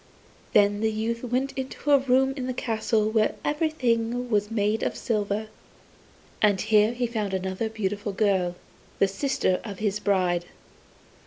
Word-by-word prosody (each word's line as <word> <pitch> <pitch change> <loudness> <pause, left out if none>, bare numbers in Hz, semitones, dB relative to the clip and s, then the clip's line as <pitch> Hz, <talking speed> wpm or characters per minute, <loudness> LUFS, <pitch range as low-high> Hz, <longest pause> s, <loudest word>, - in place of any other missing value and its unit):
Then 205 0 +4
the 220 - +2
youth 225 +2 -2
went 255 +3 -1
into 265 +2 -3
a 280 - +7
room 265 0 +2
in 260 -3 -4
the 255 - -3
castle 220 -2 0
where 220 -1 +2
everything 245 -6 0
was 210 -1 +1
made 215 0 0
of - - -1
silver, 210 -2 -1 1.0
and 205 -2 +4
here 215 +2 +3
he 245 0 -1
found 215 -5 -2
another 190 +4 -2
beautiful 205 -1 -3
girl, 190 -3 +1 0.4
the 195 - +4
sister 195 -3 0
of 205 -4 -7
his 210 -1 -1
bride. 180 -4 +1
220 Hz, 150 wpm, -26 LUFS, 205-245 Hz, 1.0 s, a